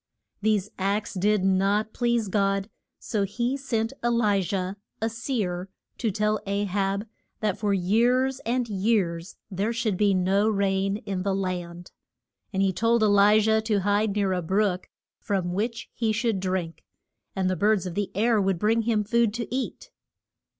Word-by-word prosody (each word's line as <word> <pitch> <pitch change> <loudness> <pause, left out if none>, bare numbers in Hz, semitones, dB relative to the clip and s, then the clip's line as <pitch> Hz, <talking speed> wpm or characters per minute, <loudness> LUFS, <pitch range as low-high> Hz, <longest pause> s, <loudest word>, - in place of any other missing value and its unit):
These 210 -1 +1
acts 200 +2 -1
did 205 +1 +1
not 195 +3 +2
please 235 -3 +1
God, 195 +1 0 0.3
so 215 - -2
he 235 +6 -1
sent 235 -4 -2
E - - +2
li 215 -4 +2
jah, 185 +1 -2 0.2
a 225 - 0
seer, 210 -6 -3 0.3
to 230 - 0
tell 210 +1 0
A 200 +1 0
hab 200 +1 -1 0.4
that 210 -2 -1
for 210 -2 0
years 240 +8 +2
and 245 0 -1
years 190 -4 0 0.2
there 200 +4 -1
should 225 -4 -1
be 200 -1 +3
no 195 +4 +2
rain 195 -1 +1
in 195 -5 -4
the 195 0 0
land. 180 -2 -4 0.6
And 195 -1 +1
he 190 -1 +2
told 230 +3 +2
E - - +5
li 205 +1 +5
jah 220 +1 +3
to 215 -2 0
hide 205 +1 +1
near 200 -2 +1
a 180 - -1
brook 190 +1 0 0.3
from 185 -3 -2
which 225 +5 -2
he 225 -2 0
should 220 -2 0
drink, 185 -3 -3 0.5
and 190 -1 0
the 185 - +1
birds 205 -1 +2
of 180 - -4
the 205 +1 -2
air 220 +1 +3
would 190 -2 +1
bring 220 +5 +2
him 220 -2 +1
food 230 0 +1
to 240 +1 -4
eat. 270 - -4
205 Hz, 170 wpm, -26 LUFS, 190-220 Hz, 0.6 s, E